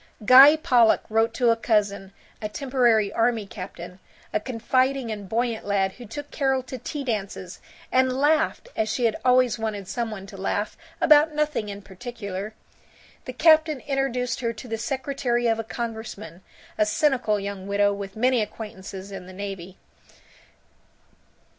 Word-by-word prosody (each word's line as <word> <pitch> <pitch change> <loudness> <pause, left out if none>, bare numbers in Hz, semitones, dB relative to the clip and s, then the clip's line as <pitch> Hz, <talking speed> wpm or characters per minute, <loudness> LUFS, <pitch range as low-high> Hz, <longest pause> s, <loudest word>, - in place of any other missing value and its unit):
Guy 265 +6 +9
Pollock 245 -7 +3
wrote 225 +1 +2
to 245 -3 +3
a - - +3
cousin, 205 -4 0 0.3
a 210 - -3
temporary 240 -5 +1
army 230 -2 +1
captain, 180 -2 -9 0.3
a - - +2
confiding 255 +2 0
and 205 -3 -6
buoyant 230 +1 -1
lad 195 -1 0
who 240 +4 -12
took 290 +7 -8
Carol 265 -2 0
to 260 0 -7
tea 290 +4 -5
dances, 195 -6 -4 0.3
and 260 0 +3
laughed, 305 - +1
as 220 0 0
she 235 +2 0
had 225 - +2
always 250 -2 +3
wanted 210 -3 -4
some 230 +3 -3
one 200 -3 -7
to 195 0 -11
laugh, 205 +2 -2 0.2
about 305 0 +5
nothing 300 -8 -1
in 200 0 -8
particular. 200 0 -7 0.7
The 255 - -6
captain 315 +1 +4
introduced 255 -3 -1
her 230 -1 -1
to 230 +3 -10
the 225 -1 -4
secretary 255 -1 -1
of 225 -1 +2
a - - -2
congressman, 220 -5 -6 0.4
a 215 - +3
cynical 250 -5 +1
young 200 -1 -6
widow 205 0 +2
with 200 -1 -7
many 250 +1 +2
acquaintances 200 -2 -7
in 185 -2 -8
the 185 - -11
navy. 190 -2 -7
225 Hz, 155 wpm, -24 LUFS, 200-255 Hz, 0.7 s, Guy